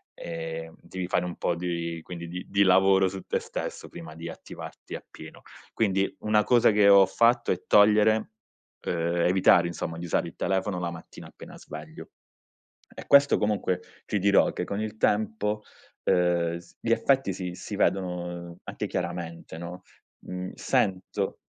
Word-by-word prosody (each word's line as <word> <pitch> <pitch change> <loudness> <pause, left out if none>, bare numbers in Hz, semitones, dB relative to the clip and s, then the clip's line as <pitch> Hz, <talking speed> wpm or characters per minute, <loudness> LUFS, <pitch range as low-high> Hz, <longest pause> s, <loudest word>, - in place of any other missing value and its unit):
ehm, 80 -1 -6
devi 95 -1 -5
fare 90 - 0
un 90 - -5
po' 85 - 0
di 85 -1 -3
di 85 - -8
quindi 90 +4 -2
lavoro 95 0 +5
su 95 0 -5
te - - 0
stesso - - -6
prima 80 -2 -10
di 85 +1 -7
attivarti - - -9
appieno. - - -11 0.3
Quindi 95 -3 +1
una 105 0 +3
cosa 120 -2 +5
che 105 -1 +4
ho 100 -1 +8
fatto 120 +3 +2
è 90 - -2
togliere 105 +1 +5 0.5
ehm, 85 0 -1
evitare, 90 -1 +5
insomma, 80 -1 -5
di 90 - -5
usare 85 - 0
il - - -10
telefono 95 -1 -1
la 85 -1 -2
mattina 85 - -11
appena - - -12
sveglio. - - -10 0.8
E - - -10
questo 140 0 +6
comunque, 105 -4 0 0.3
ti 105 - -1
dirò 100 +1 +4
che, - - -3
con 100 +2 -3
il 110 0 -5
tempo, 105 0 0 0.4
ehm, 85 -1 +2 0.2
gli 115 - -1
effetti 135 -4 +2
si 90 -1 -5
si - - -7
vedono 90 -2 -1
anche - - -4
chiaramente, 85 -2 -5
no? 85 +2 -8 0.4
Mhmm, 90 0 -5
sento 95 -1 -1
90 Hz, 155 wpm, -27 LUFS, 85-105 Hz, 0.8 s, ho